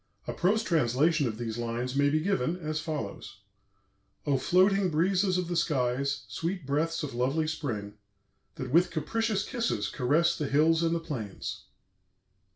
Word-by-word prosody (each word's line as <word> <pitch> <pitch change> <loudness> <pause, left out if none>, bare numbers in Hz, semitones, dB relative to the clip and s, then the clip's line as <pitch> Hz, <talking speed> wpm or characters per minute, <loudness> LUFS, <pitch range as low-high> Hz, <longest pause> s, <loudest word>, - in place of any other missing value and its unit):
A - - -3
prose 210 +5 +2
translation 155 - +2
of 110 -2 -4
these 115 -1 -4
lines 120 +2 -3
may 140 0 +4
be 155 +2 +1
given 165 -3 0
as 155 -3 -3
follows: 105 -10 -5 0.8
"O 140 -3 +2
floating 190 +4 +3
breezes 185 +4 +2
of 180 -1 -1
the 175 - -2
skies, 140 -3 0
sweet 175 -1 -3
breaths 155 +4 0
of 145 - -4
lovely 135 +6 0
spring, 110 -10 -4 0.6
that 130 -1 -5
with 175 +4 +4
capricious 210 +6 -1
kisses 230 - -1
caress 160 +7 +2
the 150 - -2
hills 160 +4 +3
and 165 0 +1
the - - 0
plains! 130 - -6
155 Hz, 155 wpm, -29 LUFS, 125-175 Hz, 0.8 s, may